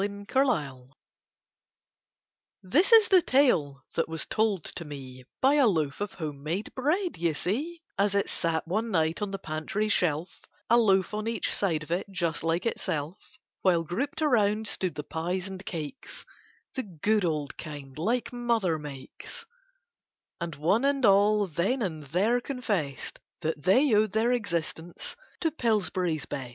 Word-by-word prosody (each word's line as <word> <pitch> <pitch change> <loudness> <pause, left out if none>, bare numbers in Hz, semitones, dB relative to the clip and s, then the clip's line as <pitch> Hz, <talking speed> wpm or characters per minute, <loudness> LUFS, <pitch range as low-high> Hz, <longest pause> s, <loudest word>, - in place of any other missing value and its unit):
This 305 - +2
is 450 -1 +8
the 375 -2 +7
tale 165 - +2
that 165 - 0
was 160 -1 -2
told 215 -6 +1
to 170 - -6
me 130 -4 -9 0.2
By 270 +2 +5
a 280 -4 +5
loaf 155 -5 0
of 205 - -3
home 150 -5 -5
made 170 +8 -3
bread, 335 +8 0
you 165 -2 +1
see, 305 - -2 0.2
As 200 0 +2
it 200 - +2
sat 165 -1 -1
one 215 +6 -1
night 160 -3 +1
on 205 - -1
the 195 - -3
pantry 185 +5 -2
shelf 170 -3 0 0.3
A 235 - +7
loaf 195 -4 +3
on 215 +1 -2
each 230 - -1
side 165 -6 0
of 150 - -11
it 180 +4 -1
just 170 -4 -2
like 165 +4 0
itself, 160 -5 -3 0.2
While 175 -3 +3
grouped 260 - -2
around 220 -6 +3
stood 185 -5 -2
the 150 - -4
pies 180 +5 -3
and 190 0 -8
cakes, 165 - -6 0.5
The 260 - -2
good 205 - 0
old 155 -4 -1
kind 145 -4 -8
like 230 +11 -1
mother 230 -9 +1
makes, 145 - -9 0.9
And 170 -2 -4
one 170 - +2
and 275 -2 +2
all 205 +1 +5
then 195 - 0
and 160 -6 -4
there 200 - +2
confessed 205 - -3 0.2
That 160 -2 -2
they 255 +7 +5
owed 210 -1 +3
their 225 +3 +2
existence 170 - -3 0.3
to 325 - +1
Pillsbury's 185 - 0
Best. 130 -3 -5
190 Hz, 155 wpm, -28 LUFS, 160-230 Hz, 0.9 s, is